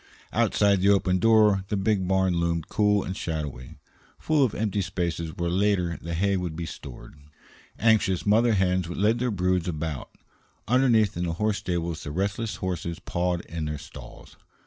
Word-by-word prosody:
Outside 100 -2 +2
the 100 - +4
open 95 -2 +3
door 105 -2 +4
the 105 - -1
big 95 -1 0
barn 95 -1 +2
loomed 85 -2 -1
cool 105 -1 +2
and 95 - -5
shadowy, 75 -8 -5 0.4
full 155 -3 +2
of 125 - 0
empty 105 -1 -1
spaces 85 -3 -3
where 85 - -2
later 90 -3 +1
the 85 +1 -4
hay 100 +3 +1
would 90 -3 -4
be 85 +1 -4
stored; 70 -5 -10 0.6
anxious 105 -5 +2
mother 115 +3 +4
hens 90 -2 +1
led 105 +6 +1
their 125 +1 0
broods 90 -3 0
about; 80 -4 -4 0.6
underneath 115 -4 +3
in 90 - -2
the 85 - -2
horse 105 +3 0
stable 85 -1 -2
the 80 -1 -7
restless 100 +7 -2
horses 85 -2 -4
pawed 90 0 -2
in 80 -2 -5
their 75 0 -3
stalls. 75 - -12
95 Hz, 170 wpm, -26 LUFS, 85-105 Hz, 0.6 s, the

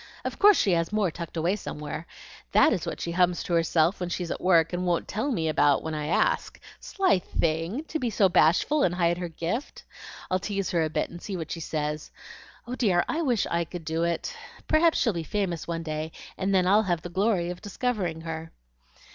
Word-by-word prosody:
Of - - -4
course 415 0 +7
she 195 - +2
has 165 0 +1
more 210 -4 +1
tucked 170 0 -7
away 170 +5 +1
somewhere. 150 -4 -6 0.5
That 315 - +6
is 185 - -3
what - - -4
she 170 - -3
hums 180 0 +2
to 175 - -3
herself 165 +1 +2
when 180 -1 -3
she's 175 -1 -3
at - - -4
work, 170 -2 +4
and 175 +1 -1
won't 175 -1 0
tell 225 +7 -2
me 165 -9 0
about 145 -2 +3
when 160 - -4
I 150 -1 -3
ask. 160 - +1 0.2
Sly 380 - +1
thing! 170 - -1
to 320 0 -4
be 245 - -1
so 205 -2 +3
bashful 180 - +3
and 175 -7 +2
hide 175 -1 +1
her 180 - -3
gift. 175 - -4 0.5
I'll 185 - +2
tease 195 0 -2
her 170 -2 +2
a 155 - -1
bit - - -2
and 175 0 -9
see 195 -3 -4
what 165 - -6
she 170 - -4
says. 150 -1 -3 0.6
Oh 245 - -6
dear, 195 -9 +2
I 325 - -1
wish 245 -9 +1
I 170 0 0
could 170 0 -8
do 160 +1 -1
it! 170 -1 -1 0.3
Perhaps 320 +1 +4
she'll 230 -5 +2
be 170 - -3
famous 175 0 -2
some 165 -1 -3
day, 155 0 -4 0.2
and 190 +1 -1
then 185 -2 +3
I'll 200 +4 +5
have 175 -6 -1
the 175 - -6
glory 185 -1 +1
of 180 - -8
discovering 205 -6 -2
her." 160 0 -6
175 Hz, 220 wpm, -27 LUFS, 165-205 Hz, 0.6 s, course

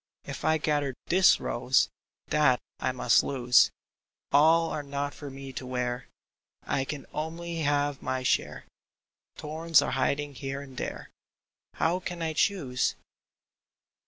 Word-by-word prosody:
If - - -7
I 160 0 +3
gather 145 -3 0
this 185 +2 +5
rose, 125 +2 +2 0.4
That 150 -4 +4 0.2
I - - 0
must 125 - +4
lose! 125 -3 +4 0.6
All 160 +3 +5
are 150 - -2
not 140 0 -3
for 145 - -8
me 135 0 -9
to 130 - -5
wear; 125 -1 -2 0.6
I 135 -1 -1
can 145 0 -6
only 165 +2 -4
have 145 -2 0
my 130 0 -2
share; - - 0 0.7
Thorns 160 +1 +2
are - - 0
hiding 140 +2 0
here 135 +2 -5
and 135 -2 -11
there; - - -5 0.6
How 170 +3 +1
can 175 -2 -5
I 160 -1 -1
choose 150 -8 +1
145 Hz, 135 wpm, -28 LUFS, 130-160 Hz, 0.7 s, this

